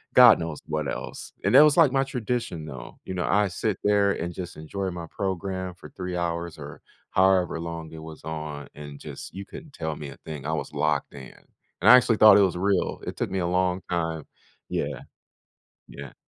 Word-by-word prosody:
god 120 -6 +9
knows 80 -2 -4
what 75 -2 -2
else. - - -7
And - - +2
that 140 - +10
was 150 0 +4
like 160 -6 +6
my 135 0 +3
tradition, 120 - -3
though. 65 -5 -9
You - - -5
know, 90 - -1
I 105 0 +3
sit 95 +2 -2
there 100 -1 +3
and 85 +1 -4
just 90 0 -7
enjoy 95 +5 -4
my 85 -1 -6
program 95 -1 -3
for - - -12
3 90 -1 -5
hours 85 -1 -3
or - - -9 0.3
however 95 -3 +3
long 85 -1 -6
it 80 - -8
was 80 -1 -10
on 75 -3 -5
and 75 -1 -9
just 70 -2 -9
you 100 +2 -7
couldn't 150 - -11
tell 80 -6 -3
me 75 -1 -7
a 70 - -11
thing. 75 -4 -7
I 80 - -1
was 80 - -4
locked 75 -2 0
in. 70 -2 -10 0.5
And - - +5
I 125 - +12
actually 120 -3 +4
thought 105 -1 +9
it - - +6
was 95 -3 +2
real. 95 0 0
It - - -4
took - - -1
me 95 - -1
a 85 - 0
long 90 +1 +1
time 80 -3 -2 0.4
Yeah. - - -3 0.9
Yeah. 70 -2 -10
90 Hz, 210 wpm, -26 LUFS, 80-100 Hz, 0.9 s, I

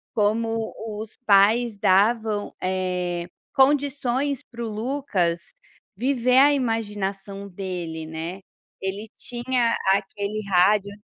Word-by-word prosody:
Como 225 +1 0 0.3
os 220 0 -7
pais 210 +3 +5
davam, 210 +2 +2
eh, 180 -2 -1 0.3
condições 280 -1 +2
para 235 0 -6
o - - -3
Lucas 215 - -2 0.4
viver 250 +2 +2
a 290 +1 +7
imaginação 205 -5 -2
dele, 175 -4 -5
né. 165 +4 -5 0.4
Ele 195 +3 -4
tinha 240 -1 0 0.2
aquele 200 +1 -2
rádio 200 +2 +4
210 Hz, 100 wpm, -24 LUFS, 190-240 Hz, 0.4 s, a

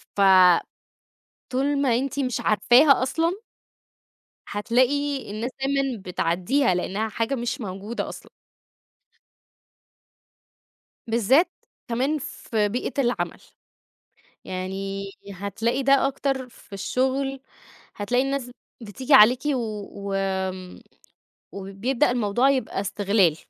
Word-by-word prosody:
ف 200 - 0 1.3
طول 280 +2 +1
ما 255 -5 +2
أنتِ 275 +2 -3
مش 250 -4 -1
عارفاها 255 +6 +5
أصلًا 325 +6 0 1.1
هتلاقي 255 +5 0
الناس 220 +4 -3
دايمًا 270 -4 -1
بتعديها 180 +7 0
لأنها 200 +5 -2
حاجة 230 +5 -1
مش 240 +2 -3
موجودة 205 +3 -5
أصلًا. - - -11 2.8
بالذات، 250 - +3 0.4
كمان 260 +6 0
في 220 -6 -2
بيئة 245 +5 -3
العمل. 245 -1 -2 1.0
يعني 195 +1 -4 0.3
هتلاقي 225 +7 -2
ده 275 0 +4
أكتر 270 -1 -2
في 235 - -20
الشغل، 265 +6 -1 0.6
هتلاقي 240 +5 +1
الناس 270 -2 -3 0.3
بتيجي 255 +6 -1
عليكِ 245 +1 +7
و 290 -2 +1 0.5
وآمم، 190 -1 -3 0.7
وبيبدأ 200 +7 -1
الموضوع 245 +2 +2
يبقى 260 -7 -1
إستغلال. 200 -4 +2
240 Hz, 95 wpm, -24 LUFS, 200-270 Hz, 2.8 s, عليكِ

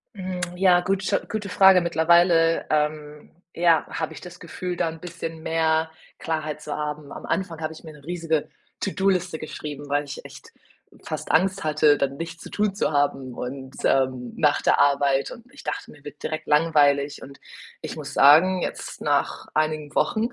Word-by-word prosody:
Hm, 185 -2 -5 0.2
ja, 180 -1 +5
gute 190 +2 0
gute 210 -3 -4
Frage. 190 -2 +6
Mittlerweile, 170 0 +3
ähm, 150 -1 -2 0.2
ja, 170 -2 +3
habe 160 - -4
ich - - -11
das 180 - -11
Gefühl, 180 +2 -5
da 165 - 0
'n 160 0 -9
bisschen 165 -2 -7
mehr 160 0 +1 0.3
Klarheit 155 -2 -3
zu 150 - -5
haben. 150 -1 -5
Am - - -8
Anfang 175 -4 -2
habe 155 - -2
ich - - -14
mir 155 - -9
'ne 150 - -16
riesige 165 -3 -2 0.3
To-do-Liste 185 -4 0
geschrieben, 145 -2 -7
weil 145 +1 +1
ich 140 -1 -8
echt - - -13 0.5
fast - - -4
Angst 190 +2 +2
hatte, 150 -1 +3
dann 140 0 -1
nichts 165 0 -7
zu - - -9
tun 205 -2 0
zu 200 - 0
haben 135 -3 0
und, 130 +2 -7
ähm 130 -2 +1
nach 150 -2 +2
der - - +3
Arbeit 140 -1 +2
und 230 - -11
ich 280 - -13
dachte, - - -4
mir 145 - -17
wird 145 0 -11
direkt 155 0 -4
langweilig 150 -2 +3
und 140 +1 -12 0.4
ich - - -6
muss - - -7
sagen, 175 +6 +6
jetzt - - -5
nach - - -1
einigen 155 -1 -1
Wochen 220 +2 +1
160 Hz, 175 wpm, -24 LUFS, 145-175 Hz, 0.5 s, Frage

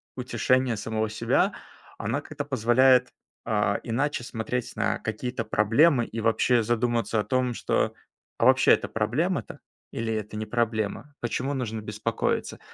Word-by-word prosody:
утешения 125 0 +1
самого 110 +1 -2
себя, 110 - +1 0.4
она - - -2
как-то 145 -2 -6
позволяет, 125 0 +4 0.4
а, 105 -2 +1
иначе 125 +2 -1
смотреть 120 +1 -4
на - - 0
какие-то 125 -2 -3
проблемы 115 +5 +3
и 115 - -6
вообще 115 +2 +3
задуматься 115 0 0
о 105 - +1
том, 130 -2 0
что, - - 0 0.4
а - - +1
вообще - - +6
это - - +1
проблема-то 130 - -1 0.3
или 115 0 -2
это 105 -1 -4
не 110 - -3
проблема? 115 +4 -2
Почему 125 +4 -2
нужно 115 -4 -3
беспокоиться? 105 +2 -2
120 Hz, 135 wpm, -26 LUFS, 110-130 Hz, 0.4 s, вообще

